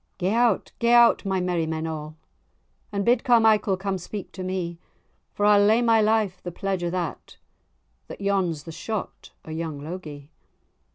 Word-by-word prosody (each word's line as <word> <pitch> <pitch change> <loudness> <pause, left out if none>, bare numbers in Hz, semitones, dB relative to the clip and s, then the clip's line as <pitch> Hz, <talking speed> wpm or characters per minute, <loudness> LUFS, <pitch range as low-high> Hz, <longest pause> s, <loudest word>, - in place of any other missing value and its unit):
"Gae 185 +2 0
out, 235 -3 +2
gae 235 0 +3
out, 235 -2 +5
my 190 -1 0
merrymen 165 -3 -1
a', 155 -1 -6 0.8
And 200 -1 -2
bid 245 0 +3
Carmichael 220 -5 +4
come 190 0 -3
speak 195 +3 -7
to 190 - -8
me; 180 -2 -4 0.6
For 205 - 0
I'll 205 -1 +6
lay 220 +4 +4
my 225 -1 +4
life 215 -4 +1
the 175 - -6
pledge 190 +1 -3
o' 175 - 0
that, 175 -3 -5 0.7
That - - -9
yon's 190 -6 0
the 165 - -8
shot 215 +5 -6 0.2
o' 160 - -8
young 160 -2 -4
Logie." 150 -2 -8
190 Hz, 165 wpm, -24 LUFS, 170-215 Hz, 0.8 s, I'll